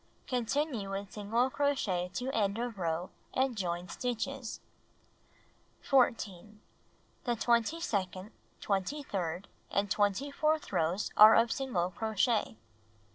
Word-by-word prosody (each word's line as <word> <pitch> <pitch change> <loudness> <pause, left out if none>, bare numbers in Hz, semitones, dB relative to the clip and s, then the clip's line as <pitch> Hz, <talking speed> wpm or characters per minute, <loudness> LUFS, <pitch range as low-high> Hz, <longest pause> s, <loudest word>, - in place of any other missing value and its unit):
Continue 250 -3 -1
with 195 0 -5
single 230 +5 0
crochet 230 -12 0
to 255 +2 -2
end 205 -4 0
of 235 -3 -4
row 170 +1 -2 0.2
and 260 -1 +1
join 175 -3 -2
stitches. 240 +5 -3 1.2
14. 215 -6 +1 0.7
The 240 -2 +1
twenty 235 +7 +2
second, 195 - -2 0.3
twenty 205 +9 -1
third 180 -4 -3 0.2
and 200 0 0
twenty 205 +8 +1
fourth 310 +1 0
rows 170 +6 0
are 215 +1 +10
of 230 0 +4
single 190 -10 -1
crochet. 220 - 0
215 Hz, 115 wpm, -31 LUFS, 190-250 Hz, 1.2 s, are